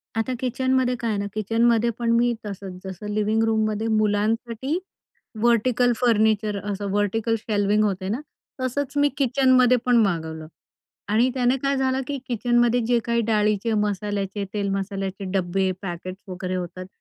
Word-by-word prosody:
आता 225 +3 -1
किचनमध्ये 260 0 +1
काय 230 - -2
आहे 210 - 0
ना, 200 - -2
किचनमध्ये 230 +2 +2
पण 235 -1 +1
मी 240 +1 +3
तसंच, 195 -2 -6
जसं 190 +2 -7
लिव्हिंग 215 +1 +1
रूममध्ये 220 0 0
मुलांसाठी 220 +6 0 0.6
व्हर्टिकल 240 +1 +3
फर्निचर, 220 -3 +2
असं 200 0 -3
व्हर्टिकल 205 +3 +1
शेल्व्हिंग 210 -1 +1
होतं 190 -2 -1
ना, 245 - -2 0.4
तसंच 255 +2 -2
मी 290 0 +4
किचनमध्ये 255 -2 +4
पण 245 -1 +4
मागवलं 160 -5 -2 0.7
आणि 235 +4 +4
त्याने 255 0 +2
काय 275 0 +1
झालं 265 0 +1
की 280 -1 -3
किचनमध्ये 240 0 +2
जे 240 0 +3
काही 235 0 +1
डाळीचे, 210 +1 +1
मसाल्याचे, 205 -1 -1
तेल-मसाल्याचे 195 -1 -2
डबे, 190 0 0
पॅकेट्स 185 +1 -6
वगैरे 185 0 -4
होतात, 180 +1 -5
215 Hz, 140 wpm, -24 LUFS, 200-245 Hz, 0.7 s, मी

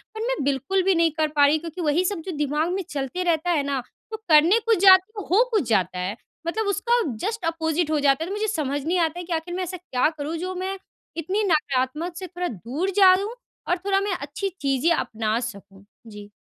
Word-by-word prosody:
पर 440 - -5
मैं - - 0
बिल्कुल 280 +8 0
भी 385 0 +3
नहीं 330 -1 +3
कर 310 - +2
पा 285 - +6
रही 295 +2 +4
क्योंकि 335 +2 -7
वही 315 +3 +2
सब 380 -3 -2
जो 375 - -4
दिमाग 300 +3 0
में 390 - -1
चलते 285 +6 -3
रहता 340 0 0
है 305 -4 +1
ना, 275 -2 -2 0.3
तो 440 - -4
करने 320 +8 +6
कुछ 455 -1 +3
जाती 375 +2 +7
हूँ, 405 - -5
हो 435 +6 +6
कुछ 415 - +1
जाता 185 -4 +1
है। 185 +3 -3 0.3
मतलब 430 +4 -1
उसका 475 +4 +1 0.2
जस्ट 440 -3 -3
अपोजिट 325 -1 -1
हो 305 - +2
जाता 280 +2 +2
है, 350 - -5
तो 400 - -3
मुझे 435 +1 -1
समझ 290 -7 -2
नहीं 350 +2 +1
आता 330 +1 0
है 355 - -6
कि 345 - -4
आख़िर 330 +2 -3
मैं 370 - -2
ऐसा 365 +1 -5
क्या 305 -6 0
करूँ 300 +3 -4
जो 370 +2 -4
मैं 380 +2 -3 0.4
इतनी 380 +7 -1
नकारात्मक 300 0 0
से 370 - -6
थोड़ा 355 0 -4
दूर 260 - -3
जाऊँ 390 +5 +5 0.3
और 355 - +1
थोड़ा 390 -1 +2
मैं 400 -1 -1
अच्छी 295 +8 -4
चीज़ें 275 +4 +1
अपना 220 -3 -1
सकूँ? 200 -4 -8 0.2
जी। 210 -1 -11
330 Hz, 225 wpm, -24 LUFS, 280-375 Hz, 0.4 s, जाती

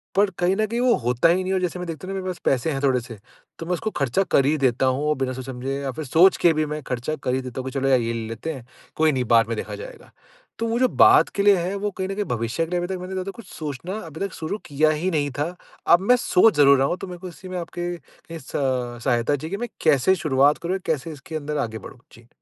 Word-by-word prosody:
पर 200 0 +4
कहीं 180 +2 +2
न 215 - +1
कहीं 235 +2 -2
वो 250 -2 +4
होता 125 +7 +3
ही 170 - +4
नहीं - - -5
है। - - +1
और 185 - +1
जैसे 180 0 -2
मैं 180 - -5
देखता 165 +2 -6
हूँ 195 - -4
ना - - -2
मेरे 185 0 -3
पास 175 - -9
पैसे 135 +4 +1
हैं 135 -1 -3
थोड़े-से, 125 -4 0 0.4
तो 165 - -5
मैं 180 - -1
उसको 200 +5 -2
खर्चा 140 +8 +1
कर 135 - +4
ही 150 +3 +2
देता 130 0 +2
हूँ 130 +3 +1
औ - - +4
बिना 130 -2 -2
सोचे-समझे 130 +1 -5
या 135 - -3
फिर 155 +4 -6
सोच 170 +8 +5
के 170 - +4
भी 155 0 0
मैं 150 0 -4
खर्चा 125 +5 -2
कर 125 - 0
ही 130 - -1
देता 130 0 -6
हूँ 130 - -5
कि - - -10
चलो 135 - 0
यार 130 -2 +5
ये 115 0 -2
ले 115 -1 -4
लेते 115 +9 -4
हैं, 130 -5 -10 0.3
कोई 155 0 +3
नहीं 130 -2 0
बाद 115 0 +5
में 115 - -2
देखा - - -5
जाएगा। - - -11 0.5
तो 230 - -1
वो 230 +2 0
जो 255 - +4
बाद 380 +6 +6
के 200 - +1
लिए 205 -1 +6
है 180 +3 -2
वो 205 +1 -2
कहीं 190 0 -4
न 195 - -3
कहीं 205 0 -2
भविष्य 120 - -1
के 165 - -13
लिए 180 - +1
अभी 175 - -2
तक 190 -1 -4
मैंने 185 +1 -6
ज़्यादा 190 +1 -3
कुछ 235 - -11
सोचना 155 +6 -5
अभी 160 0 -10
तक 195 -1 -2
शुरू 160 +6 -4
किया 150 +2 +2
ही 155 +4 -1
नहीं 145 -3 0
था, 170 +5 -2 0.3
अब 170 - +7
मैं 225 +6 +4
सोच 225 -3 +4
ज़रूर 140 -1 +7
रहा 135 +1 +2
हूँ 180 - -1
तो 195 - -7
मेरे 180 -1 -8
को 185 - -7
इसी 185 +3 -12
में 185 - -4
आपके 175 +1 -4 0.4
इस 155 -5 -10
सहायता 125 -1 0
चाहिए 155 +3 -6
कि 200 - -2
मैं 240 - -3
कैसे 155 +4 +4
शुरुआत 145 -3 +3
करूँ 175 +2 -2
या 195 - -3
कैसे 160 0 -2
इसके 155 +2 -9
अंदर 150 0 -4
आगे 115 -6 -2
बढ़ूँ? 130 - -12
जी। 115 0 -17
155 Hz, 290 wpm, -23 LUFS, 130-185 Hz, 0.5 s, अब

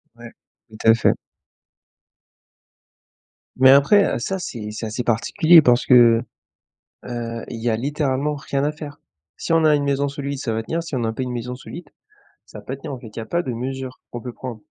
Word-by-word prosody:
Ouais. 120 0 -12 0.4
Tout 110 - -13
à 115 - +8
fait. 115 - +3 2.4
Mais 130 0 +6
après, 145 +9 +5
heu, - - -3
ça 190 +10 -3
c'est 115 -11 -6
c'est 110 +2 -6
assez 110 +3 -4
particulier 155 - +5
parce 125 -2 +3
que, 120 -2 +6 0.8
heu, 115 -1 -5
Il 115 - -6
y 120 - 0
a 110 - +1
littéralement 145 +2 -1
rien 140 -1 -3
à 150 - +1
faire. 150 -1 -10 0.4
Si - - -2
on 165 -1 +4
a 155 -1 +5
une 145 - -1
maison 140 0 0
solide, 140 0 -5
ça 120 -5 -3
va 110 0 -2
tenir, 165 +8 -2
si 165 -4 -6
on 130 - -1
n'a 115 -1 -1
pas 130 - -3
une 125 - -4
maison 125 +1 -5
solide, 150 +4 -10 0.6
ça - - -12
va - - -12
pas 135 - -5
tenir 135 - -8
en 130 - -6
fait. 120 - -11
Il 105 - -18
y - - -2
a 110 - -7
pas 170 +8 -1
de 130 - -4
mesure 130 +2 -5
qu'on 120 - -6
peut 125 0 -7
prendre. 120 -3 -8
130 Hz, 215 wpm, -21 LUFS, 115-145 Hz, 2.4 s, à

